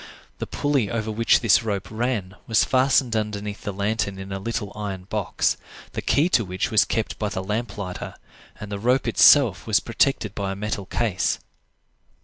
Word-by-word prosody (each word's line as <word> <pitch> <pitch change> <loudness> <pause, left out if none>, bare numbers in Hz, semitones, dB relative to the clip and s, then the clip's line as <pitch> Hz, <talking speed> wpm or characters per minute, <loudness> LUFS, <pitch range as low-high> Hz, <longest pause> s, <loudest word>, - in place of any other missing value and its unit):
The - - -4
pulley 140 -8 0
over 110 -1 -2
which 115 +2 +3
this 115 -4 +5
rope 100 -4 -3
ran 110 -5 -2
was 115 - +3
fastened 130 -2 +2
underneath 105 -1 -3
the 100 - -4
lantern 100 0 -1
in 95 0 -8
a 95 - -3
little 105 0 -3
iron 100 -3 -5
box, 105 +1 -1 0.3
the - - -4
key 150 +4 +2
to 120 - +3
which 95 -1 -3
was 110 - +5
kept 110 - -2
by 105 - -1
the 95 -2 -4
lamp 105 +2 -3
lighter, 90 -3 -6 0.4
and 105 0 -8
the 100 - -3
rope 125 +5 +1
itself 115 - +5
was 110 -2 +4
protected 115 -2 0
by 100 -2 -3
a - - -7
metal 100 -1 -4
case. 105 -3 0
105 Hz, 180 wpm, -24 LUFS, 100-115 Hz, 0.4 s, this